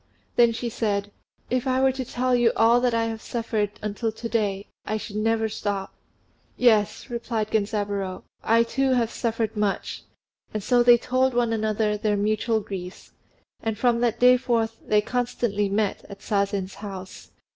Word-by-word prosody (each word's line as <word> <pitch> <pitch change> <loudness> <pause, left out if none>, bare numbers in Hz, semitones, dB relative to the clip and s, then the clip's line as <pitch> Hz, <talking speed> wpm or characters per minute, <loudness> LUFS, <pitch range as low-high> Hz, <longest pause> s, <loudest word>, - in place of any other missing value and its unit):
Then 235 -1 +5
she 230 +1 -4
said, 205 -3 -1 0.4
"If 255 0 0
I 260 0 +2
were 265 0 +4
to 260 0 -4
tell 250 +1 -1
you 240 -1 +4
all 235 +2 +4
I 230 -2 +2
have 225 -1 -3
suffered 225 -3 -2
until 215 +2 -2
to 225 +2 -6
day, 205 -4 -1 0.2
I 215 - -2
should 210 -1 -6
never 225 +1 +1
stop." 200 -2 -3 0.6
"Yes," 225 0 +2
replied 230 -2 -2
Genzaburô, 200 -3 -1 0.2
"I 230 +1 +4
too 265 +3 +1
have 235 -3 +1
suffered 230 -1 -2
much;" 210 -2 -2 0.5
and 210 - -2
so 245 +3 +3
they 240 0 +7
told 255 +1 +1
one 240 -2 +2
another 215 -1 0
their 210 0 0
mutual 215 +2 +1
griefs, 185 -3 -8 0.5
and 225 -1 -2
from 240 0 +2
that 240 -2 0
day 250 0 +7
forth 225 -3 0
they 210 0 +3
constantly 225 -3 -1
met 205 0 0
at 200 0 -10
Sazen's 200 -2 -1
house. 190 -3 -8
225 Hz, 165 wpm, -25 LUFS, 205-240 Hz, 0.6 s, they